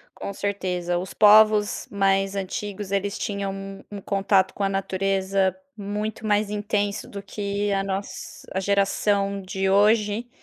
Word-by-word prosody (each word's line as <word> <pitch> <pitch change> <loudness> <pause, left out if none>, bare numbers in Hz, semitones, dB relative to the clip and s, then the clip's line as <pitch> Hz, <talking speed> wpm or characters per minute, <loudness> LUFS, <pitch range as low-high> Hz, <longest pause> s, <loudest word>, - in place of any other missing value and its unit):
com 200 - -6
certeza. 180 -3 -2
Os 185 +2 -5
povos 215 0 +5
mais 195 0 +1
antigos, 195 +1 -4
eles 200 +2 -1
tinham 200 -2 -3
um 195 0 -8
um 200 - -6
contato 195 -1 +2
com 205 - -3
a 195 - +2
natureza 195 0 0 0.2
muito 210 +1 -4
mais 210 -1 +2
intenso 205 -1 -2
do 200 - -7
que 200 +1 -3
a 195 - 0
nos 195 +1 -5
a 190 - 0
geração 200 0 +1
de 190 0 -2
hoje 210 +3 +3
200 Hz, 145 wpm, -24 LUFS, 195-205 Hz, 0.2 s, povos